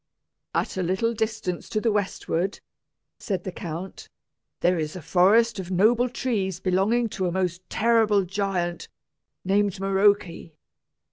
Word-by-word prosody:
"At - - -1
a - - 0
little 190 +6 0
distance 220 -5 -3
to 215 - 0
the 225 +1 +1
westward," 195 -2 -1 0.6
said 190 -4 -3
the 185 - -4
count, 175 +2 -7 0.5
"there 175 -1 +2
is 155 +1 -3
a - - -5
forest 200 +7 +4
of 185 -2 -6
noble 225 +7 +3
trees 200 -8 -2
belonging 195 +6 +1
to 185 -2 -2
a - - -1
most 180 -1 -1
terrible 220 -3 +3
giant, 180 -2 -2 0.6
named 200 0 +1
Maroke. 195 +1 +3
195 Hz, 135 wpm, -25 LUFS, 180-215 Hz, 0.6 s, forest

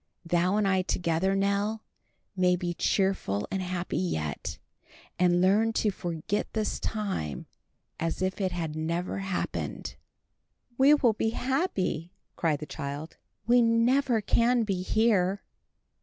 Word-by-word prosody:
Thou 175 +4 +2
and 210 -2 +2
I 190 -1 +3
together, 180 +1 0
Nell, 200 +2 0 0.5
may 180 -1 +3
be 175 -1 -3
cheerful 180 - 0
and 190 - -1
happy 180 -1 -2
yet, 80 - -3 0.6
and 175 -1 +4
learn 210 +5 +3
to 215 -1 +1
forget 175 +2 -3
this 215 -1 -1
time 195 - -3 0.5
as 165 0 -2
if 185 +2 -1
it 190 -1 0
had 165 -3 -3
never 170 +5 -2 0.3
been." - - -4 0.9
"We 275 +4 +6
will 245 -6 +3
be 225 +1 0
happy!" 245 - -1 0.2
cried 155 -3 0
the - - -4
child, 145 +1 -6 0.3
"We 245 +1 +5
never 230 +1 +3
can 235 +3 +3
be 195 -4 -1
here." 200 -2 +2
190 Hz, 130 wpm, -28 LUFS, 175-220 Hz, 0.9 s, We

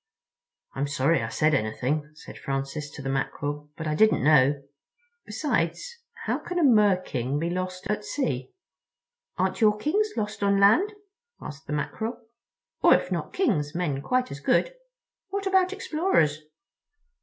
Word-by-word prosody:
"I'm 140 +1 -2
sorry 140 +3 +1
I 115 - -3
said 155 +5 +2
anything," 140 +5 -1
said - - -12
Francis 135 +2 -4
to 140 - -8
the 135 - -3
Mackerel, 145 +2 -3
"but 160 - -5
I 155 - 0
didn't 215 +7 +3
know. 140 -1 +4 0.6
Besides, 475 -1 -2 0.3
how - - 0
can 355 - -5
a 345 - +3
Mer 210 -8 +5
king 130 -5 -3
be 165 +3 -1
lost 185 +1 -4
at 210 +1 -2
sea?" 135 - -2 0.9
"Aren't - - -1
your 210 -1 +4
Kings 400 - +1
lost 210 0 -3
on 200 0 +3
land?" 340 - +5 0.5
asked 140 -1 -9
the 150 - -3
Mackerel, 225 +10 -3 0.6
"or - - +7
if - - -2
not - - -3
Kings, 150 - 0
men 150 -6 -1
quite 255 - 0
as 140 - -6
good? - - +1 0.6
What 400 +1 -3
about 380 -1 +3
explorers?" 310 - +1
165 Hz, 155 wpm, -26 LUFS, -, 0.9 s, or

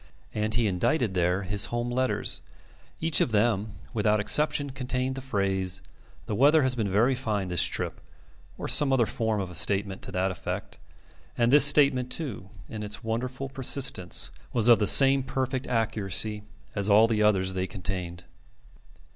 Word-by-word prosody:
And 110 0 -2
he 120 -1 +1
indited 105 - -1
there 90 +2 -1
his 100 +2 +3
home 120 0 -4
letters. 130 - -1 0.6
Each 160 -2 +2
of - - 0
them, 105 -1 0 0.2
without 105 -1 0
exception, 150 +5 +2
contained 130 0 -3
the 135 - -7
phrase, 95 -6 -2 0.4
"The - - -5
weather 145 +7 +3
has 130 -1 +2
been 110 -5 -3
very 110 +7 +2
fine 105 -7 -3
this 90 -2 +1
trip," - - -2 0.6
or - - -6
some 145 -2 +4
other 130 -3 +2
form 110 -1 -3
of 95 -2 -5
a - - -11
statement 95 +3 +1
to - - -8
that 95 +1 -1
effect. 90 - -7 0.6
And 120 0 +1
this 145 0 +8
statement, 140 -3 +3
too, 125 - -5 0.2
in 110 - -8
its 105 +3 -7
wonderful 125 +4 -4
persistence, 130 -8 0 0.2
was 120 -2 0
of 120 -2 +6
the 105 - +1
same 135 +3 +6
perfect 130 0 -4
accuracy 105 -3 +1 0.3
as 100 0 0
all 105 +2 +5
the 110 -2 -1
others 95 -3 +1
they 95 0 -3
contained. 90 -3 -6
110 Hz, 165 wpm, -26 LUFS, 95-130 Hz, 0.6 s, this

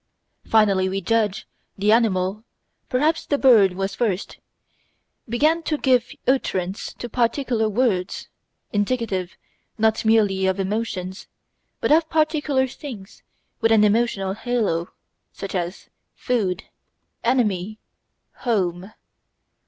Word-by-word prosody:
Finally, 200 -4 +3
we 195 +1 -2
judge, 215 +1 0 0.3
the 205 +2 +2
animal 210 -2 +2 0.5
perhaps 305 +6 +1
the 285 - +1
bird 225 -9 +5
was 195 +1 -3
first 200 -3 -2 0.9
began 305 +8 +2
to 310 -2 -1
give 250 -4 +2 0.2
utterance 195 -8 -1
to 240 - -6
particular 235 -1 0
"words," 205 -5 0 0.5
indicative 205 -4 -1 0.4
not 220 0 +2
merely 205 -4 +3
of 190 +1 0
emotions, 195 -2 -3 0.5
but - - +1
of 315 +1 +4
particular 305 -4 +1
things 245 -7 -9 0.4
with 225 -1 +2
an 220 -1 +5
emotional 210 -3 +1
halo, 215 -7 -1 0.4
such 195 - -7
as 180 0 -4 0.2
"food," 200 -7 -1 0.6
"enemy," 215 -5 0 0.6
"home." 190 -4 -1
215 Hz, 105 wpm, -22 LUFS, 190-245 Hz, 0.9 s, bird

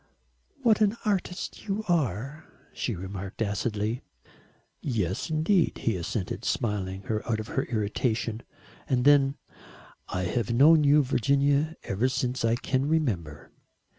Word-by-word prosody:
"What 220 -3 +4
an 210 +2 +3
artist 195 -1 -2
you 205 +2 -1
are," 140 - -1 0.3
she 115 - -2
remarked 95 +1 -7
acidly. 105 +2 -2 0.8
"Yes, 100 - -2
indeed," 160 +3 +2
he 115 - +1
assented, 90 +3 -3
smiling 95 -4 -2
her 110 +1 -2
out 110 - 0
of 110 - -6
her - - -1
irritation. 110 0 -1 0.5
And 125 -1 +1
then: 140 -1 +5 0.7
"I 90 - -2
have 110 +5 -1
known 150 +6 +6
you, 145 +1 +5
Virginia, 140 +4 +2
ever 110 +7 0
since 125 -1 -1
I 115 0 +3
can 130 +2 -1
remember." 105 - -1
125 Hz, 130 wpm, -27 LUFS, 105-150 Hz, 0.8 s, known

